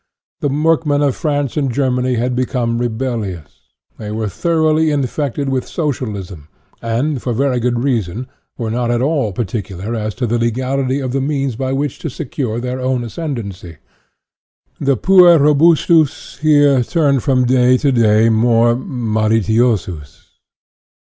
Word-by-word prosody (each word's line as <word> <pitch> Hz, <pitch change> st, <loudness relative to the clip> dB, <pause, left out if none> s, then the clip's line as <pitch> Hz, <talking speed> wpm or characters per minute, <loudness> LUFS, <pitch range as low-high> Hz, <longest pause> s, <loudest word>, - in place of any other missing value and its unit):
The -, -, -1 dB
workmen 150 Hz, 0 st, +1 dB
of 140 Hz, -3 st, +1 dB
France 145 Hz, -3 st, -2 dB
and 140 Hz, -3 st, 0 dB
Germany 125 Hz, -1 st, 0 dB
had 125 Hz, +2 st, -1 dB
become 125 Hz, -2 st, -1 dB
rebellious. 110 Hz, -, -4 dB, 0.4 s
They 105 Hz, -, -6 dB
were 110 Hz, 0 st, -3 dB
thoroughly 155 Hz, -, +1 dB
infected 140 Hz, 0 st, -2 dB
with 130 Hz, -2 st, -2 dB
socialism, 105 Hz, -, -4 dB, 0.3 s
and, 125 Hz, +4 st, -1 dB
for 125 Hz, -, -2 dB
very 130 Hz, +1 st, 0 dB
good 120 Hz, 0 st, -1 dB
reasons, 115 Hz, -4 st, -1 dB, 0.3 s
were 115 Hz, -3 st, -3 dB
not 120 Hz, +1 st, -1 dB
at 120 Hz, +1 st, 0 dB
all 140 Hz, -7 st, 0 dB
par 115 Hz, +5 st, -2 dB
ticular 100 Hz, +1 st, -5 dB
as 110 Hz, -1 st, -3 dB
to 125 Hz, -, -2 dB
the 120 Hz, +1 st, 0 dB
legality 130 Hz, +3 st, -1 dB
of 130 Hz, -2 st, -3 dB
the 135 Hz, +1 st, -1 dB
means 135 Hz, -3 st, -1 dB
by 130 Hz, +2 st, -3 dB
which 140 Hz, 0 st, -2 dB
to 160 Hz, -, -4 dB
secure 125 Hz, -3 st, -4 dB
their 125 Hz, +1 st, -4 dB
own 130 Hz, -1 st, -1 dB
ascendency. 110 Hz, -, -6 dB, 1.0 s
The 140 Hz, -2 st, +1 dB
puer 180 Hz, -, +6 dB
ro 150 Hz, 0 st, +4 dB
bustus, 160 Hz, 0 st, +2 dB
here, 145 Hz, -4 st, +4 dB
turned 140 Hz, -2 st, +1 dB
from 130 Hz, -1 st, +1 dB
day 125 Hz, 0 st, +4 dB
to 140 Hz, +2 st, +1 dB
day 115 Hz, -2 st, +3 dB
more 115 Hz, +1 st, +3 dB
malitiosus. 110 Hz, -, -1 dB
125 Hz, 150 wpm, -17 LUFS, 115-140 Hz, 1.0 s, puer